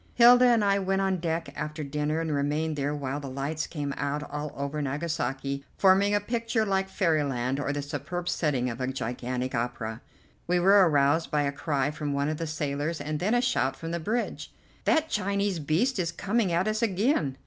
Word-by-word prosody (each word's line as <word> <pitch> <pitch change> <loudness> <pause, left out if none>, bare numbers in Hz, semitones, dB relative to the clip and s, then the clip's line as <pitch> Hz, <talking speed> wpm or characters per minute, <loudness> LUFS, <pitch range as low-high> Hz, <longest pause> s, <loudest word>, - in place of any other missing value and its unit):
Hilda 245 +1 +8
and 235 -4 +4
I 200 0 +3
went 195 0 0
on 190 -1 +1
deck 165 -3 -2
after 150 +1 -4
dinner 150 +2 -1
and 160 -2 -2
remained 150 +2 0
there 145 +1 -1
while 140 0 -3
the 140 -2 -6
lights 140 +4 -3
came 145 -3 -4
out 145 +1 -2
all 150 0 -4
over 140 +2 -3
Nagasaki, 140 -2 -2
forming 195 +2 +4
a - - +3
picture 230 +1 -1
like 190 -1 0
fairyland 140 -8 0
or 145 - -1
the 145 0 -3
superb 145 +5 -5
setting 145 -7 0
of 120 +1 -4
a 130 - 0
gigantic 125 0 -3
opera. 115 -1 -3 0.5
We 175 +1 +2
were 190 0 +6
aroused 145 +2 +2
by 150 -1 +1
a 140 - 0
cry 140 -1 -1
from 150 -1 -3
one 140 +1 0
of 155 - -2
the 165 - -3
sailors, 150 +1 -2
and 150 0 -3
then 210 +7 +1
a 245 - +3
shout 135 - +1
from 165 0 -6
the 170 - -2
bridge. 220 +8 -2 0.3
"That 320 -1 +3
Chinese 200 - 0
beast 180 - +1
is 170 -2 0
coming 200 +3 0
at 175 +4 +1
us 215 0 0
again!" 195 - +1
155 Hz, 200 wpm, -27 LUFS, 140-190 Hz, 0.5 s, Hilda